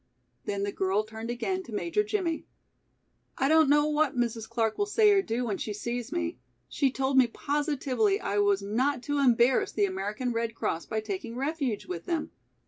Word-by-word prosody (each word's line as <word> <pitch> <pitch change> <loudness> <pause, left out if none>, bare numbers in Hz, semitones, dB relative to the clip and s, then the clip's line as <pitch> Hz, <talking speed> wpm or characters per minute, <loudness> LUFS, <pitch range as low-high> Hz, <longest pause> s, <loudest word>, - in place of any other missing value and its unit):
Then 200 -1 -2
the 200 - -1
girl 195 +2 0
turned 220 +1 -8
again 370 +11 -2
to 360 - -12
Major 340 - 0
Jimmie. 375 -6 -2 0.9
"I 270 - +2
don't 315 -1 +5
know 295 +1 +5
what 300 -3 +1
Mrs. 230 -2 -1
Clark 225 -2 -1
will 410 - +1
say 420 0 +5
or 395 -1 +5
do 245 - -2
when 205 -4 -2
she 210 - -3
sees 235 +3 -4
me. 85 +7 -2 0.3
She 270 - +1
told 265 0 +2
me 255 - +5
positively 290 - 0
I 205 - -1
was 205 -1 +2
not 245 +6 0
to 290 +2 -1
embarrass 245 -1 +4
the 205 - +2
American 205 +6 -3
Red 230 0 -2
Cross 165 - -2
by 220 -1 -2
taking 215 +2 -5
refuge 275 -4 -2
with 170 -2 -6
them. 330 -3 -2
245 Hz, 190 wpm, -28 LUFS, 215-295 Hz, 0.9 s, don't